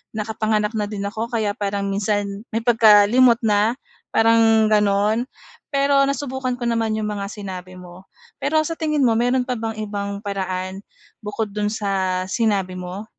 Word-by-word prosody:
nakapanganak 215 0 -1
na 210 -1 -1
din 205 -2 -5
ako 220 +3 -4
kaya 215 -3 0
parang 200 -2 -2
minsan 200 0 -1
may 225 - 0
pagkalimot 230 +1 +6
na 210 +2 +2 0.4
parang 225 -1 +4
gano'n. 210 +2 +2 0.5
Pero 275 0 +3
nasubukan 265 -2 -2
ko 240 - -3
naman 225 -2 0
'yong 215 - -2
mga 200 -1 -4
sinabi 185 -3 -8
mo. 180 +1 -13 0.4
Pero 300 +3 +1
sa 330 - -3
tingin 305 -3 +1
mo 230 - +4
mayro'n 250 +1 +1
pa 255 - -1
bang 225 0 -3
ibang 200 -1 -4
paraan, 190 -1 -4 0.4
bukod 210 0 -3
do'n 210 0 -1
sa 190 -3 -1
sinabi 200 -4 0
mo? 180 +3 -6
210 Hz, 155 wpm, -21 LUFS, 200-230 Hz, 0.5 s, pagkalimot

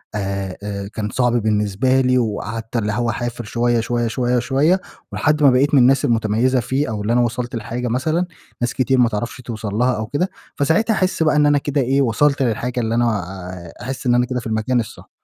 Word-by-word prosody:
آآ 100 -2 -3
آآ 100 -1 -4
كان 105 -1 -3
صعب 125 +1 +1
بالنسبة 110 +3 +1
لي، 125 0 +2
وقعدت 115 0 -3
اللي 105 -2 0
هو 120 +2 0
أعافر 120 0 -3
شويّة، 120 +2 0
شويّة، 120 +1 -1
شويّة، 125 +1 0
شويّة، 145 +9 +2 0.3
ولحد 150 0 +1
ما 140 - +8
بقيت 140 +4 +2
من 140 - +6
الناس 135 +2 +4
المتميزة 115 +3 +2
فيه، 135 +5 -1
أو 105 -2 -3
اللي 110 +3 0
أنا 120 - +4
وصلت 120 +1 -2
لحاجة 120 +2 -4
مثلًا 155 +9 0 0.4
ناس 120 0 0
كتير 130 0 +1
ما 125 -2 +4
تعرفش 115 +3 -4
توصل 110 -4 -5
لها 125 +3 +2
أو 110 0 -4
كده، 145 - -1 0.3
فساعتها 160 +10 +2
أحسّ 185 -4 +1
بقى 155 -1 +2
إن 150 - +4
أنا 145 0 +4
كده 145 0 0
إيه، 135 +2 +2
وصلت 140 +4 +2
للحاجة 120 +1 -1
اللي 115 -1 -1
أنا 120 0 +2
آآ 90 -1 -8
أحسّ 130 +1 -5
إن 120 - +4
أنا 125 0 +3
كده 125 0 -3
في 115 - -7
المكان 110 +3 0
الصح. 115 - -7
120 Hz, 215 wpm, -20 LUFS, 110-130 Hz, 0.4 s, ما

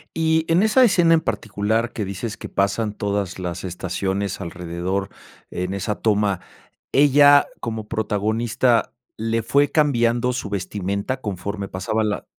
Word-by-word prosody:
Y 160 0 +2
en 170 +3 +4
esa 220 +5 +5
escena 175 -7 +5
en 160 - +1
particular 110 -1 -1
que 105 - -3
dices 100 +3 -5
que - - -7
pasan 100 +2 0
todas 100 -3 -2
las 90 -1 -4
estaciones 95 +2 -3
alrededor 90 +3 -3 0.4
en 90 +1 -3
esa 100 +2 -2
toma, 105 -3 +1 0.5
¿ella 145 0 +6
como 110 -2 -5
protagonista 110 +3 0 0.2
le 115 +1 -1
fue 140 +6 +2
cambiando 125 -5 +2
su 120 -5 -4
vestimenta 100 +5 -3
conforme 100 -2 -4
pasaba 95 +4 -2
la 105 -1 -2
105 Hz, 135 wpm, -22 LUFS, 100-125 Hz, 0.5 s, ella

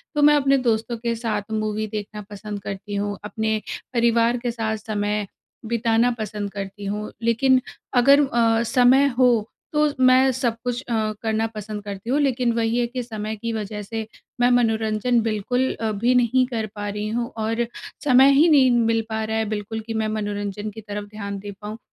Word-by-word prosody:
तो 295 - +2
मैं 295 0 +7
अपने 275 -1 +3
दोस्तों 235 -2 0
के 230 0 -2
साथ 220 -3 -3
मूवी 215 0 -1
देखना 210 0 -6
पसंद 205 0 -6
करती 200 +1 -5
हूँ, 205 0 -2
अपने 220 +1 -1 0.3
परिवार 235 0 +3
के 240 0 -2
साथ 220 -2 -2
समय 210 -1 -2 0.4
बिताना 230 +1 +2
पसंद 210 -1 -4
करती 200 0 -6
हूँ। 210 +2 -3
लेकिन 255 +3 +3 0.3
अगर 275 +3 +6
अ, 230 -3 +2
समय 255 +3 +5
हो 250 -1 +6 0.4
तो 300 0 +3 0.2
मैं 255 +1 +6
सब 245 -2 -1
कुछ 245 +1 -2
करना 220 0 -1
पसंद 210 0 -6
करती 200 +2 -7
हूँ। 275 +4 +2
लेकिन 255 -4 +1
वही 230 0 0
है 245 - +2
कि 250 +1 -4
समय 220 -2 -5
की 230 +2 -4
वजह 210 -1 -4
से 220 +2 -5 0.3
मैं 245 - +5
मनोरंजन 225 0 +2
बिल्कुल 230 +4 0
अ, 220 -1 0
भी 230 +5 +1
नहीं 250 +1 +3
कर 230 -4 -2
पा 205 0 -4
रही 210 +1 -3
हूँ 235 +2 -1
और 225 +2 0 0.4
समय 265 -1 +6
ही 295 +5 +5
नहीं 270 -5 +6
मिल 230 -1 +2
पा 220 0 -2
रहा 220 0 -2
है 220 - 0
बिल्कुल 215 +1 -4
कि 225 - -3
मैं 220 -1 0
मनोरंजन 205 -1 -3
की 220 - -7
तरफ 205 0 -6
ध्यान 200 -1 -5
दे 205 +1 -7
पाऊँ। 210 +1 -6
225 Hz, 185 wpm, -23 LUFS, 210-245 Hz, 0.4 s, मैं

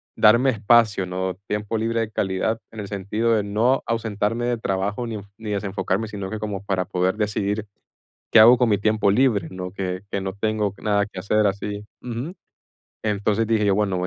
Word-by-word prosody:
darme 120 +5 +5
espacio, 110 -3 +3
¿no? 95 0 -3
Tiempo 105 +2 -2
libre 115 +1 0
de 110 -1 -3
calidad, 100 +3 -1
en 110 - -9
el 100 - -5
sentido 105 +4 -1
de 110 -2 +2
no 110 +6 +1
ausentarme 115 0 -1
de 120 -1 0
trabajo 100 +2 -2
ni-ni 105 -1 -7
desenfocarme, 100 +1 -1
sino 100 -2 -5
que 110 - -4
como 105 -2 -4
para 95 -2 -1
poder 95 +2 0
decidir 105 0 -1 0.6
qué - - +7
hago 120 +3 +9
con 120 -1 +2
mi 105 - +3
tiempo 105 0 +2
libre, 105 -5 +2
no 90 0 -6
que 95 -1 -4
que 100 - -1
no 95 0 -3
tengo 105 0 -1
nada 105 -1 +2
que 100 -3 -8
hacer 105 +3 +2
así. 100 +1 -3 0.2
Ujú. 125 +7 -5 0.7
Entonces 105 +1 0
dije 110 -1 +2
yo: 100 -1 +3
"Bueno, 100 -2 +1
voy 90 - -1
105 Hz, 190 wpm, -23 LUFS, 100-110 Hz, 0.7 s, hago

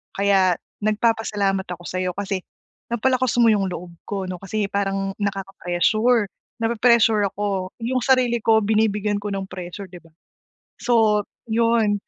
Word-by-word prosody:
Kaya 195 -2 +3 0.3
nagpapasalamat 210 -3 +1
ako 175 0 -7
sa'yo, 185 0 -2
kasi 195 -1 -3 0.5
napalakas 255 +1 +1
mo 235 - +6
yung 200 -3 +2
loob 175 0 -7
ko 195 -2 -4
'no, 185 - -3
kasi 200 +1 -2
parang 195 -1 -1
nakaka-pressure, 200 +3 +1 0.3
napre-pressure 225 -2 +3
ako, 195 -2 -2
yung 255 +3 0
sarili 255 -3 +3
ko 220 -1 +5
binibigyan 210 -1 +1
ko 205 +1 -5
ng 195 -1 -4
pressure, 185 +2 -7
'di 180 - -11
ba? 165 - -21 0.7
So, 220 -4 +3 0.3
yun. 225 -2 +2
205 Hz, 135 wpm, -22 LUFS, 195-225 Hz, 0.7 s, mo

